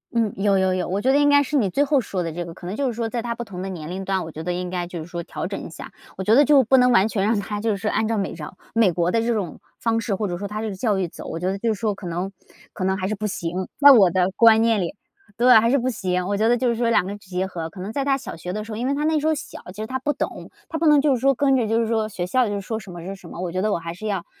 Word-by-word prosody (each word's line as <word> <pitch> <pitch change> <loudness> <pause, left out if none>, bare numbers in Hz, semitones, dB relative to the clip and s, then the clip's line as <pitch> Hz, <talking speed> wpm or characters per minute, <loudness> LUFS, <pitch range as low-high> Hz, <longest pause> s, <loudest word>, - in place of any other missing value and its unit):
嗯， 225 -3 +2
有 200 0 +2
有 190 -1 +2
有， 185 -1 -1
我 195 +3 -1
觉 260 - +3
得 280 - +4
应 290 - +4
该 285 0 +5
是 285 +2 -1
你 210 -7 +2
最 275 +10 +2
后 285 -1 +2
说 190 -5 -3
的 165 - -3
这 175 +1 -5
个， 165 - -8
可 175 - -12
能 185 - -4
就 280 -2 0
是 240 - -1
说 230 0 -3
在 235 -1 -2
他 235 0 -3
不 240 - -5
同 190 -5 -8
的 190 - -4
年 170 -4 -6
龄 190 +1 -5
段， 190 -1 0
我 160 - -8
觉 155 - -7
得 180 +2 -2
应 180 0 -3
该 175 -1 -3
就 175 -1 -6
是 155 - -6
说 170 0 -5
调 - - -5
整 - - -5
一 - - -8
下。 - - -10 0.3
我 190 - -3
觉 210 - +3
得 285 +4 +6
就 285 -3 +6
不 265 +3 +4
能 250 0 +5
完 210 -2 +5
全 195 -3 0
让 215 0 +2
他 205 +1 -4
就 220 -1 0
是 200 +2 -2
按 215 +1 0
照 225 -1 0
美 195 - -2
照 165 +2 -9 0.2
美 225 -5 +4
国 175 +1 +1
的 230 - +2
这 235 +1 +1
种 195 -8 -3 0.2
方 225 0 +1
式， 215 -4 -1
或 210 +1 -2
者 175 -2 -3
说 200 - -5
它 210 +1 -5
这 220 - -3
个 200 - -5
教 205 0 0
育 185 -3 -1
走， - - -10
我 165 - -5
觉 180 - -2
得 195 +1 -1
就 225 0 +1
是 200 - -8
说 215 -3 0
可 195 -2 -9
能 180 +3 -3 0.4
可 185 - -4
能 190 0 +1
还 185 0 -2
是 215 - -1
不 210 +2 -3
行。 180 -1 -3
在 285 - +10
我 205 -9 +7
的 180 +1 +1
观 225 -1 +7
念 225 -3 +2
里 175 +3 -3 0.4
对， 250 +2 +6
还 230 - +2
是 275 - +4
不 255 -1 0
行， 180 -6 -1
我 200 +2 -1
觉 220 - +2
得 245 +1 +4
就 250 0 +1
是 235 - +1
说 235 0 +1
两 225 -5 +3
个 200 +2 -5
结 185 -2 -3
合， 170 -3 -5
可 185 +3 -13
能 200 - -5
在 275 +4 -1
他 275 -1 +2
小 260 - -8
学 180 +2 -6
的 215 +1 -3
时 220 - -9
候， 215 - -4
因 245 +3 -2
为 280 - +1
他 295 - -2
那 310 0 +2
时 300 - -1
候 315 - +2
小 - - -8
其 215 - -6
实 - - -3
他 260 +3 -3
不 290 +4 0
懂， - - -5 0.2
他 320 -3 -4
不 330 - +2
能 295 -1 +6
就 285 -1 +3
是 250 - -1
说 275 -1 +3
跟 270 +1 +3
着 240 -4 +1
就 225 +2 +1
是 230 - 0
说 220 -1 0
学 175 -3 -4
校 245 +6 +2
就 205 -1 -2
说 220 +3 -4
什 195 - -11
么 175 -1 -8
是 195 - -5
什 190 -3 -14
么， - - -9
我 180 -2 -3
觉 185 - -1
得 215 +1 +1
我 - - +1
还 165 0 -6
是 215 +5 -7
要 195 -4 -2
210 Hz, 385 characters per minute, -23 LUFS, 185-235 Hz, 0.4 s, 在